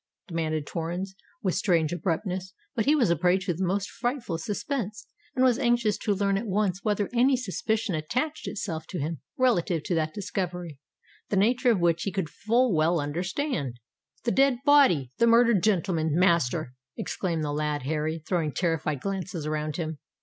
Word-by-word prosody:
demanded 155 -4 -2
Torrens, 175 +4 -4 0.3
with 185 -3 +1
strange 170 -5 +2
abruptness: 185 +3 -2 0.2
but 225 - 0
he 295 +3 +5
was 240 - +3
a - - +4
prey 180 +3 +3
to 180 -2 -2
the 180 +4 -3
most 195 +2 0
frightful 240 - -3
suspense, 215 - -3 0.3
and 255 - +4
was 250 0 +3
anxious 240 -5 +2
to 210 -3 0
learn 200 0 +1
at 230 - -5
once 195 -2 0
whether 205 -2 0
any 255 +2 +4
suspicion 220 -2 -1
attached 255 - -2
itself 165 -6 -4
to 185 - -5
him 155 -2 -3 0.2
relative 180 - +2
to 180 - -2
that 155 -2 0
discovery, 180 -5 -4 0.5
the 200 - +1
nature 245 +5 +3
of 220 -5 +3
which 170 -1 +2
he 195 - -1
could 185 -5 -3
full 235 +1 +2
well 165 +2 +3
understand. 160 - -2 0.4
"The 235 - +1
dead 270 -1 +4
body—the 235 - +4
murdered 230 -3 +5
gentleman, 170 -6 +1
master!" 165 -6 +2 0.2
exclaimed 175 -7 -2
the 145 -1 -2
lad 150 -2 -1
Harry, 155 +2 -2
throwing 165 -6 0
terrified 155 -3 -1
glances 185 -5 -3
around 155 -1 -2
him. 160 -3 -4
185 Hz, 170 wpm, -27 LUFS, 160-220 Hz, 0.5 s, he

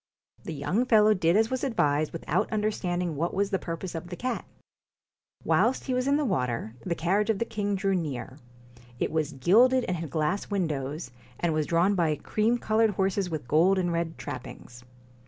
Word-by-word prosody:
The - - -5
young 195 - 0
fellow 215 -2 +6
did 180 -1 +2
as 225 +2 +2
was 260 - -2
advised, 155 - +1
without 165 - -1
understanding 180 -6 -1
what 170 +5 -2
was 200 +1 0
the 190 - +1
purpose 165 +2 -5
of 165 0 -6
the 175 - -6
cat. 255 +6 -3 1.0
Whilst 255 - +2
he 260 - -2
was 255 +1 0
in 280 - +3
the 300 - 0
water, 125 - -1
the 175 -2 -1
carriage 195 +6 +1
of 220 - +2
the 230 - -1
king 205 -3 -2
drew 195 0 0
near; 140 -6 -4 0.6
it - - -1
was 155 -2 -1
gilded 235 - +4
and 185 - -2
had 165 -2 -5
glass 155 +6 -1
windows, 155 -7 -2 0.3
and 170 -2 +1
was 155 -1 0
drawn 170 +4 +3
by 165 -5 +1
cream 220 +9 0
coloured 220 -1 +2
horses 195 -1 0
with 155 -7 -5
gold 170 +8 +4
and 175 -2 0
red 165 -1 -2
trappings. 125 -2 -8
180 Hz, 190 wpm, -27 LUFS, 155-210 Hz, 1.0 s, fellow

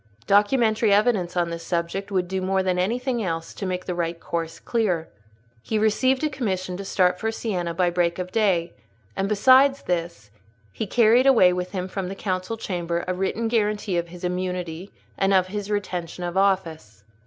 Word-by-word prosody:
Documentary 220 - +3
evidence 200 -4 +2
on 170 -1 +1
this 165 0 -6
subject 175 +4 -2
would 185 -2 0
do 190 +1 -2
more 190 0 +1
than 185 -1 0
anything 240 +5 -1
else 165 -3 -3
to 195 - -5
make 185 0 -3
the 180 - -2
right 170 -1 -2
course 165 -1 -4
clear. 190 -9 -1 0.5
He 220 - -2
received 255 +6 +2
a 305 - +2
commission 190 -8 -2
to 200 - -6
start 180 -2 +2
for 225 0 -1
Siena 180 -7 -3
by 175 0 +2
break 170 -1 0
of 180 0 -5
day; 185 -6 +1 0.4
and, 195 +1 -1
besides 260 +6 +5
this, 170 - -3 0.4
he 215 - -4
carried 235 +5 +4
away 205 -9 +6
with 180 +1 -4
him 185 -1 -3
from 190 -1 -4
the 195 - -5
council 185 +2 -3
chamber 175 -5 -3
a 185 - 0
written 195 +5 -1
guarantee 210 -3 0
of 170 - -4
his 175 +1 -12
immunity 180 0 -3 0.3
and 195 0 +3
of 185 -1 +4
his 205 0 -5
retention 180 -4 -3
of 175 0 -4
office. 165 - 0
185 Hz, 185 wpm, -24 LUFS, 175-210 Hz, 0.5 s, away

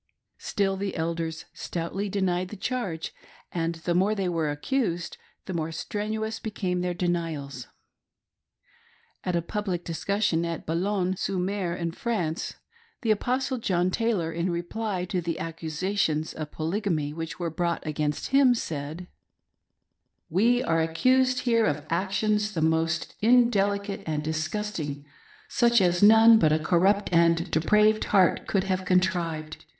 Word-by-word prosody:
Still 195 -1 -1
the 195 0 -3
elders 165 -1 -3
stoutly 185 +4 -4
denied 185 -2 0
the 210 - -7
charge, 195 -7 -3 0.4
and 165 -1 -1
the 165 +1 -2
more 195 +5 +2
they 195 -3 -1
were 165 -3 0
accused 175 - -1 0.3
the 185 - -5
more 165 -1 -2
strenuous 215 +6 -3
became 185 -4 -2
their 180 0 -1
denials. 160 -7 -3 1.6
At 180 - -1
a 170 - 0
public 190 -2 -3
discussion 175 0 0
at 170 -1 -4
Boulogne 185 +3 0
sur 190 - -2
mer 185 -1 -1
in 170 -2 -2
France, 180 -5 -2 0.5
the 225 - +2
Apostle 255 +4 0
John 185 -4 +1
Taylor, 205 -7 0
in 170 +2 -1
reply 180 +2 -2
to 180 0 -2
the 165 -1 -3
accusations 160 0 -2
of 155 -2 -6
Polygamy 160 -3 -1
which 160 -1 -5
were 170 -2 -2
brought 170 +1 -2
against 150 -1 -2
him, 270 -2 +5
said: 155 -3 -5 0.6
" - - -54 0.3
We 235 +8 +3
are 165 0 +2
accused 255 +10 +2
here 230 -3 +3
of 150 0 -2
actions 210 +4 0
the 160 - 0
most 160 0 0
indelicate 205 -4 +3
and 150 -1 -1
disgusting, 155 -2 -3 0.4
such 235 -1 +3
as 175 -2 +2
none 225 +2 +8
but 155 -5 +4
a 155 - +4
corrupt 190 +6 +2
and 170 +1 +3
depraved 210 +7 +3
heart 190 -4 +3
could 195 -2 +1
have 190 -1 -1
contrived. 170 -4 0
180 Hz, 140 wpm, -26 LUFS, 165-210 Hz, 1.6 s, none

